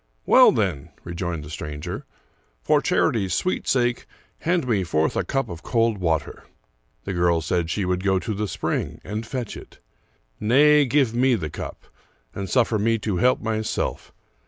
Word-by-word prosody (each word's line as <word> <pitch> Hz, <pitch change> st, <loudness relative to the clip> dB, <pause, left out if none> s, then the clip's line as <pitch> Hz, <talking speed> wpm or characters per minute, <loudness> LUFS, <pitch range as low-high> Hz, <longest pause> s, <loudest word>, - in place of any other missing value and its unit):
" -, -, -44 dB
Well, -, -, +9 dB
then," 90 Hz, -10 st, -1 dB
rejoined 85 Hz, -2 st, -4 dB
the 75 Hz, -, -10 dB
stranger, 75 Hz, -2 st, -6 dB, 0.3 s
" -, -, -41 dB
for -, -, +3 dB
charity's 95 Hz, -6 st, +1 dB
sweet 185 Hz, -, -1 dB
sake, 120 Hz, -2 st, +1 dB, 0.3 s
hand 170 Hz, -4 st, 0 dB
me 105 Hz, -6 st, +1 dB
forth 80 Hz, -2 st, 0 dB
a -, -, +1 dB
cup 135 Hz, -3 st, -1 dB
of 85 Hz, -4 st, -8 dB
cold 115 Hz, -3 st, +1 dB
water." 80 Hz, -4 st, -2 dB, 0.6 s
The 95 Hz, -, -4 dB
girl 85 Hz, -1 st, +2 dB
said 80 Hz, +1 st, -1 dB
she 100 Hz, +2 st, -1 dB
would 90 Hz, 0 st, -1 dB
go 95 Hz, -1 st, +2 dB
to 110 Hz, +4 st, -3 dB
the 105 Hz, +1 st, -2 dB
spring -, -, -3 dB
and 105 Hz, +3 st, -5 dB
fetch 125 Hz, -5 st, -4 dB
it. -, -, -12 dB, 0.4 s
" -, -, -40 dB, 0.2 s
Nay, 145 Hz, +6 st, +5 dB
give 130 Hz, -3 st, +2 dB
me 125 Hz, +1 st, +3 dB
the 80 Hz, -8 st, -4 dB
cup, -, -, -7 dB, 0.5 s
and 100 Hz, -1 st, -5 dB
suffer 115 Hz, -4 st, +2 dB
me 115 Hz, +2 st, +2 dB
to 105 Hz, -4 st, -2 dB
help 125 Hz, +6 st, +3 dB
myself. 110 Hz, -1 st, -2 dB
105 Hz, 180 wpm, -23 LUFS, 85-120 Hz, 0.6 s, Well